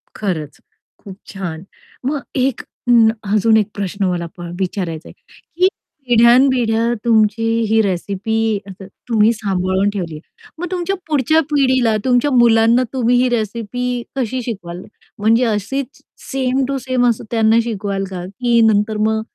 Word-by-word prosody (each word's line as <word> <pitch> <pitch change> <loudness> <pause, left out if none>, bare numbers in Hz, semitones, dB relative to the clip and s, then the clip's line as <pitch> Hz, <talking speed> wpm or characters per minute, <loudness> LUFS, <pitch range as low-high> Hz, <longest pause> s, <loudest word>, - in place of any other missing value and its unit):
खरंच, 160 -8 -4 0.4
खूप 195 -2 -11
छान. 185 -4 -6 0.4
मग 285 +1 -1
एक 260 -2 0
अ, 245 - -6 0.4
अजून 220 +1 +4
एक 210 -2 +1
प्रश्न 200 0 -2
मला 175 -2 -1
प - - -9 0.2
विचारायचा 180 -4 -3
आहे, - - -13
की 365 +2 -3 0.4
पिढ्यान 240 +2 +6
पिढ्या 230 -2 +1
तुमची 220 -1 +3 0.3
ही 220 0 +4
रेसिपी 200 +2 -2 0.3
असं 190 0 -10 0.2
तुम्ही 220 -1 +4
सांभाळून 190 -2 0
ठेवली 180 -6 -4
आहे, 150 - -9 0.4
मग 355 - -3
तुमच्या 365 +1 -1
पुढच्या 310 +1 +2
पिढीला, 260 -5 +2
तुमच्या 255 +3 +2
मुलांना 235 0 +4
तुम्ही 245 -2 +2
ही 255 - +2
रेसिपी 240 +2 -2
कशी 260 -1 -2
शिकवाल? 185 -6 -6 0.4
म्हणजे 225 +4 +3
अशीच 240 +5 -3 0.3
सेम 265 0 0
टू 275 0 -2
सेम 255 -1 0
असं 230 - -2
त्यांना 225 0 +3
शिकवाल 200 -3 -3
का? 180 -2 -5
की 235 +5 0
नंतर 210 +1 0
मग 220 0 0
225 Hz, 145 wpm, -18 LUFS, 200-250 Hz, 0.4 s, पिढ्यान